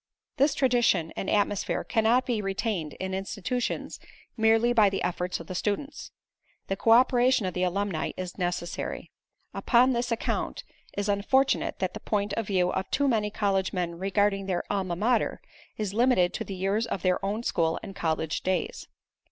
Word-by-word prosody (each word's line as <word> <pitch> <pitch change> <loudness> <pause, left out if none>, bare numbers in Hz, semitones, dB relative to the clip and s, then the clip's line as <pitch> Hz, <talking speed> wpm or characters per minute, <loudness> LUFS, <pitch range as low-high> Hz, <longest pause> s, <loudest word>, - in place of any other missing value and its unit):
This 280 +2 +3
tradition 240 - +2
and 195 - -3
atmosphere 205 -1 0
cannot 230 +2 +2
be 235 -4 -1
retained 195 -5 -2
in 190 0 -5
institutions 200 +5 -3 0.4
merely 225 +1 +3
by 215 -4 +5
the 195 - -3
efforts 180 0 -2
of 165 - -9
the 185 - -6
students. 245 +10 -3 0.6
The 195 - 0
co 215 - -1
operation 245 -1 +5
of 185 - -2
the 180 - -2
alumni 185 -2 -1
is 185 -1 -5
necessary. 175 -2 -3 0.6
On 250 +1 +6
this 240 +1 -1
account 230 - -2 0.3
it - - -6
is 200 - -3
unfortunate 265 +7 +1
that - - -2
the - - -6
point 205 -1 -1
of 225 -1 -2
view 180 -3 +2
of 190 - -3
too 285 0 +1
many 215 -5 +1
college 195 -2 0
men 175 -2 -2
regarding 195 0 +1
their 185 -2 -1
Alma 190 -4 -1
Mater 230 +7 +1 0.4
is 210 -3 -3
limited 230 -6 +3
to - - -3
the 195 - -6
years 195 +5 0
of 190 - -4
their 185 -1 +1
own 210 +4 -2
school 165 -7 0
and 195 - -8
college 160 -3 -1
days. 190 - -2
200 Hz, 175 wpm, -27 LUFS, 185-230 Hz, 0.6 s, On